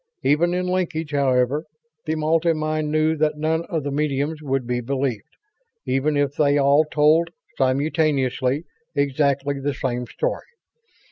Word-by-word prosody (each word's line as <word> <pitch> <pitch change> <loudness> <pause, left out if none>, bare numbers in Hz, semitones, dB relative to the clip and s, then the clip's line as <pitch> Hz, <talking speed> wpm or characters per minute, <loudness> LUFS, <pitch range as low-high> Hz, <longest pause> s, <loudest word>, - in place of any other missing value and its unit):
Even 170 +5 +2
in 180 0 -1
linkage, 175 -4 -2
however, 135 0 +1 0.4
the 160 - 0
multi 160 +2 +2
mind 155 -1 -2
knew 155 +1 +2
that 150 -1 0
none 160 +2 0
of 165 -6 -3
the 145 - -3
mediums 150 +1 -1
would 135 -3 -1
be 125 0 -1
believed, 135 0 -3 0.5
even 135 +3 +1
if 145 -1 +1
they 145 -1 +3
all 140 +2 +4
told, 155 +3 +4 0.3
simultaneously, 140 0 +1 0.3
exactly 140 0 +1
the 140 +1 -2
same 125 -2 -3
story. - - -3
145 Hz, 140 wpm, -22 LUFS, 135-155 Hz, 0.5 s, all